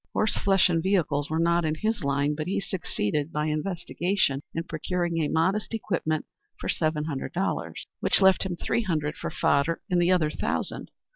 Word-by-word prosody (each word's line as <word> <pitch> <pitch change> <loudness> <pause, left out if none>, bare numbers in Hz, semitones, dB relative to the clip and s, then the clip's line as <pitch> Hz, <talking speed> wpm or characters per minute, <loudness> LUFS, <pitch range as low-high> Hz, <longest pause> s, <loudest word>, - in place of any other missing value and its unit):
Horse 215 -1 +1
flesh 195 -1 +4
and 165 -2 +1
vehicles 160 -6 +1
were 160 - 0
not 170 +1 +3
in 155 -1 0
his 215 +2 -1
line, 140 +1 +1
but 155 +2 -4
he 190 - 0
succeeded 150 - -2
by 150 0 -1
investigation 170 -1 0
in 165 - -1
procuring 170 +1 -2
a 155 - +1
modest 190 +9 +1
equipment 165 -7 -1 0.3
for - - -5
seven 155 -2 0
hundred 145 -4 -4
dollars, 190 +3 -2
which - - +2
left 190 -1 +5
him 185 -2 -2
three 235 - 0
hundred 155 -7 -1
for - - -4
fodder, 145 +4 +1
and 175 -1 +4
the 175 - +3
other 160 -5 +3
thousand. - - -3
165 Hz, 185 wpm, -27 LUFS, 150-185 Hz, 0.3 s, left